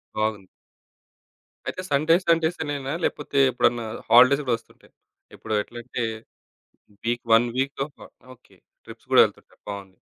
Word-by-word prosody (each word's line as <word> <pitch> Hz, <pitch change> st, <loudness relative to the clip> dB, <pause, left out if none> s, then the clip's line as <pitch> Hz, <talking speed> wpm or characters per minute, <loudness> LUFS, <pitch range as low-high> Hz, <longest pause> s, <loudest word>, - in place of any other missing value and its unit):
బాగుంది. 110 Hz, -3 st, -2 dB, 1.2 s
అయితే 185 Hz, -, -4 dB
Sunday 155 Hz, +4 st, +4 dB
Sundays 165 Hz, 0 st, +2 dB
అనేనా 145 Hz, -1 st, -4 dB
లేపోతే 145 Hz, -1 st, -2 dB
ఎప్పుడన్నా 120 Hz, -1 st, +1 dB, 0.2 s
హాలిడేస్ 130 Hz, +4 st, +7 dB
గూడా 125 Hz, -3 st, +1 dB
ఒస్తుంటాయ? 115 Hz, -, -23 dB, 0.4 s
ఇప్పుడు 110 Hz, -, -6 dB
ఎట్లా 120 Hz, -, -11 dB
అంటే, 120 Hz, -1 st, -4 dB, 1.0 s
వీక్ 120 Hz, +1 st, -1 dB
వన్ 120 Hz, +2 st, +5 dB
వీకొక 140 Hz, +2 st, -3 dB, 0.3 s
ఓకే. 125 Hz, -, -25 dB, 0.3 s
ట్రిప్స్ -, -, -14 dB
గూడా -, -, +8 dB
వెళ్తుంటారు. -, -, -8 dB
బావుంది. 100 Hz, -2 st, -8 dB
125 Hz, 125 wpm, -24 LUFS, 115-145 Hz, 1.2 s, గూడా